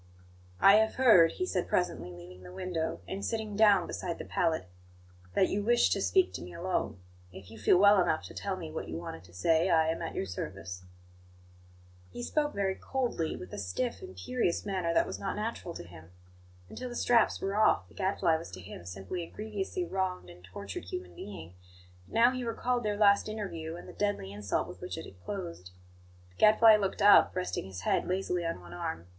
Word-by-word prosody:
"I 200 +1 +8
have 220 0 +2
heard," 215 -11 +6
he 365 - -2
said 185 - -1
presently, 180 - -1
leaving 90 +1 -12
the 90 -1 -11
window, 165 - -3
and 195 +1 -5
sitting 220 -2 -3
down 200 -4 +5
beside 170 - -4
the - - -7
pallet, 160 - 0 0.7
"that 190 - +4
you 205 - -1
wish 240 +3 +3
to - - +1
speak 375 -1 +3
to - - -5
me - - -9
alone. 180 - -2 0.3
If 95 +2 -12
you 110 - -11
feel 105 - +5
well 200 0 +6
enough 170 -3 +1
to - - -10
tell 195 -2 -3
me 165 -3 -7
what 160 - -5
you 80 - -5
wanted 85 0 -7
to 85 - -18
say, 160 - +2
I 160 -2 +4
am 165 - -2
at 165 - -5
your - - -1
service." 90 -1 -6 1.2
He 120 +6 -7
spoke 295 - 0
very 195 -1 0
coldly, 240 -10 -2
with 90 - -9
a - - -5
stiff, 100 - -3
imperious 255 - -2
manner 185 -4 -1
that 165 - +3
was - - -6
not 195 - -3
natural 210 -5 -4
to - - -7
him. 85 -2 -13 0.6
Until 255 - -7
the 240 - -7
straps 235 -2 +3
were 195 +1 -2
off, 215 +1 +3
the - - -20
Gadfly 190 -4 +1
was 160 - -8
to 95 - -7
him 90 -1 -10
simply 95 - -5
a 165 - -7
grievously 215 - -4
wronged 185 - -3
and 90 +1 -16
tortured 95 0 -7
human 90 -1 -7
being; 85 -4 -9 0.5
but - - -17
now 235 +2 +6
he 255 -1 -4
recalled 240 +1 -1
their 210 -2 -1
last 200 0 +4
interview, 170 -7 -5
and 175 - -10
the - - -10
deadly 205 - -2
insult 100 -1 -2
with - - -11
which - - -5
it - - -6
had 90 -2 -15
closed. 170 - -6 0.6
The 90 - -26
Gadfly 215 0 +7
looked 200 0 -1
up, 205 -2 +7
resting 185 - -2
his 95 -1 -8
head - - +1
lazily 180 -1 -1
on 165 - -3
one 85 0 -12
arm. 85 -1 -4
180 Hz, 210 wpm, -30 LUFS, -, 1.2 s, I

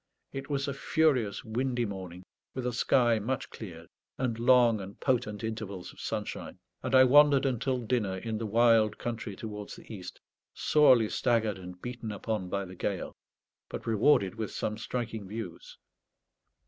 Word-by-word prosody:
It 135 +1 -6
was 140 -1 -1
a 140 - -1
furious 140 -8 +1
windy 120 +2 -1
morning, 95 -3 -7 0.3
with 130 -1 -3
a 125 - -1
sky 120 -1 +3
much 125 +4 -3
cleared, 85 -7 -9 0.3
and 120 -3 -1
long 120 -3 +5
and 95 +1 -9
potent 120 -5 0
intervals 110 -5 -5
of - - -17
sunshine; - - -4 0.2
and 130 0 0
I 130 - +9
wandered 140 +1 +6
until 130 0 0
dinner 105 -6 0
in 110 +2 -3
the 115 - -3
wild 115 0 +4
country 115 -3 -4
towards 105 -1 -7
the - - -11
east, 95 -4 -8 0.4
sorely 130 -7 +5
staggered 110 -5 +1
and 90 0 -9
beaten 120 0 -5
upon 105 -2 -3
by 100 +1 -2
the 95 - -10
gale, - - -3 0.5
but - - -6
rewarded 110 -3 +3
with 110 -1 -4
some 105 - -2
striking 110 -2 -4
views. 100 -4 -7
115 Hz, 160 wpm, -30 LUFS, 105-125 Hz, 0.5 s, I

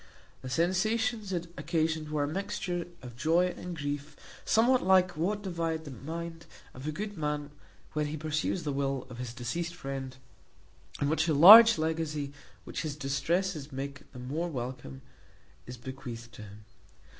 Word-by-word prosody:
The 130 - -6
sensations 210 - +1
it 175 -1 -3
occasioned 160 0 0
were 150 -1 0
a - - 0
mixture 180 0 -3 0.2
of 120 -2 -9
joy 165 +7 +2
and 180 -2 -7
grief; 145 0 -4 0.3
somewhat 245 +3 +4
like 185 -1 +4
what 205 +6 -1
divide 165 -3 -2
the 145 - -7
mind 165 +5 -7 0.3
of 130 +3 -8
a - - 0
good 205 +3 -5
man 150 -1 -2 0.4
when 150 -1 0
he 155 +1 -4
peruses 155 +3 -1
the 145 -2 -2
will 135 -1 -1
of 120 - -9
his 125 -2 -4
deceased 165 +9 -4
friend, 135 -4 -6 0.8
in 140 - +1
which 160 +2 +1
a 155 - +2
large 220 +9 +11
legacy, 155 -3 -2 0.3
which - - -5
his 155 -3 -3
distresses 150 +3 -1
make 140 +1 -6
the - - -12
more 145 +8 -3
welcome, 125 - -6 0.6
is 125 +1 -7
bequeathed 120 -2 -8
to - - -10
him. 105 0 -12
155 Hz, 160 wpm, -30 LUFS, 135-175 Hz, 0.8 s, large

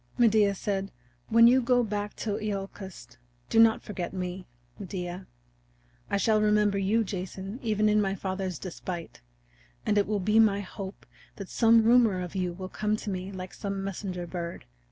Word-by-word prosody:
Medea 215 -4 +4
said: 195 0 -2 0.4
"When 230 +1 +6
you 255 +2 +6
go 245 0 +3
back 205 -1 -3
to 210 -1 -3
Iolcus 195 - -6 0.3
do 225 - +4
not 225 -1 +5
forget 185 -4 -5
me, 180 0 -4 0.3
Medea. 180 -1 -5 0.8
I 200 - +1
shall 215 +1 +3
remember 210 -1 +3
you, 210 +4 +2
Jason, 190 +2 -6
even 215 -2 +1
in 210 0 +4
my 195 -1 0
father's 190 -2 -3
despite. 175 - -7 0.6
And 205 - +3
it 200 - +1
will 210 -1 0
be 215 +4 +3
my 205 -2 +4
hope 195 0 -8 0.3
that 195 -2 -8
some 230 -1 +5
rumor 230 -4 +5
of 180 -1 -5
you 185 -2 -1
will 185 +2 -7
come 210 +2 -1
to 215 - -5
me 185 +1 -4
like 185 -1 -7
some 195 -1 -4
messenger 185 -2 -4
bird. 170 -1 -6
200 Hz, 170 wpm, -28 LUFS, 185-215 Hz, 0.8 s, When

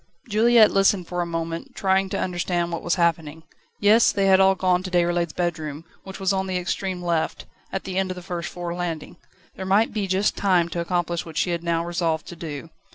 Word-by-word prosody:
Juliette 225 0 +5
listened 195 -2 +2
for 175 0 -2
a 175 - -2
moment, 165 0 -4
trying 190 0 +1
to - - -2
understand 175 -1 -1
what 170 - -3
was 175 - 0
happening. 160 -3 0 0.4
Yes; 215 +3 +5
they 195 -1 0
had 190 -1 +5
all 190 0 +5
gone 185 -1 +2
to 185 - -6
Déroulède's 175 -2 +1
bedroom, 160 -3 -3 0.2
which 190 0 -8
was 195 0 +1
on 190 0 -1
the 185 -1 -1
extreme 180 0 -3
left, 170 -2 -1 0.3
at 195 - -3
the 190 0 -2
end 190 -1 -1
of 185 - -4
the 180 - -9
first 175 -2 -4
floor 175 -1 -5
landing. 175 -3 -5 0.4
There - - -6
might 200 +4 +2
be 210 -3 -1
just 190 +2 +1
time 180 -4 +2
to 170 - -4
accomplish 175 -1 -1
what 160 -2 -9
she 175 - +1
had 170 0 -2
now 170 0 0
resolved 170 -2 -1
to 175 - -8
do. 160 -1 -7
175 Hz, 220 wpm, -24 LUFS, 170-190 Hz, 0.4 s, Juliette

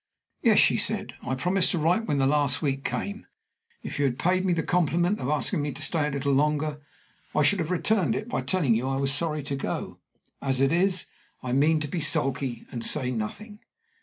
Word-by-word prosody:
"Yes," - - +4
she - - +5
said. - - -1
"I 130 - -3
promised 180 +7 +2
to - - -1
write 175 +8 +1
when 145 - 0
the 135 - +2
last 140 -1 +2
week 135 -2 -1
came. 200 +2 -4 0.6
If - - -5
you 145 - +2
had 125 -2 0
paid 185 +1 +1
me 185 - +2
the 165 -1 -1
compliment 175 +3 +1
of 125 - -3
asking 150 0 0
me 145 0 -2
to 145 - -6
stay 155 -2 +1
a - - -1
little 140 0 -1
longer, 150 +1 0 0.5
I 150 - +3
should 200 +6 +3
have 160 -1 -2
returned 180 - +1
it 215 - -4
by 245 - -2
telling 170 -11 +1
you 120 +4 -1
I 135 - -1
was 135 0 +1
sorry 155 -1 0
to 140 0 -4
go. 135 - -5 0.4
As 135 -2 0
it 135 +1 +3
is, 180 +1 +2 0.4
I 125 - -3
mean 155 +4 +3
to 150 - -2
be 165 +3 -3
sulky 135 -4 +1
and 120 -2 -5
say 125 -1 +2
nothing." 205 - -6
150 Hz, 220 wpm, -26 LUFS, 135-175 Hz, 0.6 s, she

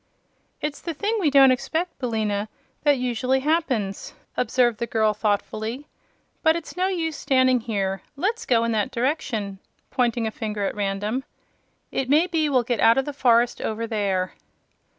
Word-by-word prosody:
"It's 300 -1 -3
the 335 -2 -4
thing 430 +8 -1
we 335 -7 +3
don't 270 -2 +7
expect, 320 +7 -2
Billina, 215 -4 -1 0.3
that 290 -2 +4
usually 255 +1 0
happens," 260 -10 -1 0.2
observed 240 -4 +2
the 235 - -2
girl, 220 -1 +2
thoughtfully. 215 +5 -2 0.6
"But 320 -1 +4
it's 335 -2 -6
no 365 +1 +1
use 330 -5 -2
standing 260 -2 +3
here. 195 -5 -2
Let's 415 +11 -2
go 230 -2 +3
in 230 - 0
that 215 -2 0
direction," 235 -7 -2 0.3
pointing 240 -3 +1
a 220 - -1
finger 210 -2 -3
at - - -1
random. 205 +5 -2 0.7
"It 260 -1 -2
may 305 +5 +5
be 325 -4 0
we'll 255 -3 +3
get 240 -2 -1
out 230 +2 +5
of 270 - +2
the 290 - -4
forest 240 -3 +3
over 220 +1 -2
there." 200 -5 -1
245 Hz, 165 wpm, -24 LUFS, 215-290 Hz, 0.7 s, don't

